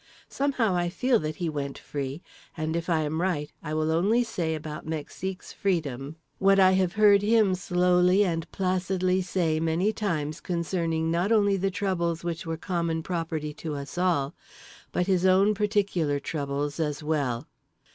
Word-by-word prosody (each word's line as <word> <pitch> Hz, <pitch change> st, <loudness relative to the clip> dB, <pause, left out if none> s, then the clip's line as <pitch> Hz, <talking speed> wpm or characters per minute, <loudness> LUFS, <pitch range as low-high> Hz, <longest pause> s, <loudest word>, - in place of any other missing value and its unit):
Somehow 265 Hz, -7 st, +1 dB
I 175 Hz, 0 st, +1 dB
feel 250 Hz, +5 st, +2 dB
that 155 Hz, 0 st, -3 dB
he 175 Hz, -, -3 dB
went 140 Hz, -3 st, -3 dB
free… 140 Hz, +2 st, -5 dB, 0.3 s
and 155 Hz, 0 st, -2 dB
if 170 Hz, +1 st, -3 dB
I 165 Hz, -2 st, +2 dB
am 155 Hz, +2 st, -1 dB
right, 160 Hz, -5 st, -1 dB
I 155 Hz, -1 st, -4 dB
will 155 Hz, 0 st, +1 dB
only 205 Hz, +9 st, +3 dB
say 175 Hz, -9 st, -2 dB
about 155 Hz, 0 st, -7 dB
Mexique's 165 Hz, +4 st, -5 dB
freedom 150 Hz, -7 st, -2 dB, 0.2 s
what 195 Hz, 0 st, +5 dB
I 185 Hz, -1 st, +7 dB
have 185 Hz, -2 st, +2 dB
heard 205 Hz, -1 st, +6 dB
him 210 Hz, -2 st, +3 dB
slowly 180 Hz, +2 st, +3 dB
and 165 Hz, -3 st, -2 dB
placidly 185 Hz, 0 st, 0 dB
say 175 Hz, -3 st, 0 dB
many 165 Hz, +6 st, +1 dB
times 155 Hz, -8 st, -2 dB
concerning 165 Hz, -2 st, -1 dB
not 175 Hz, +5 st, +1 dB
only 205 Hz, -3 st, +4 dB
the 195 Hz, +1 st, 0 dB
troubles 175 Hz, -4 st, -1 dB
which 170 Hz, 0 st, -4 dB
were 165 Hz, 0 st, -2 dB
common 170 Hz, -2 st, -2 dB
property 160 Hz, -4 st, -3 dB
to 155 Hz, -3 st, -3 dB
us 140 Hz, 0 st, -7 dB
all 175 Hz, -6 st, +1 dB, 0.6 s
but 180 Hz, -, 0 dB
his 185 Hz, -2 st, +1 dB
own 190 Hz, +3 st, +5 dB
peculiar 200 Hz, -8 st, 0 dB
troubles 145 Hz, 0 st, -3 dB
as 150 Hz, -1 st, -2 dB
well. 140 Hz, -5 st, -1 dB
170 Hz, 165 wpm, -27 LUFS, 155-190 Hz, 0.6 s, I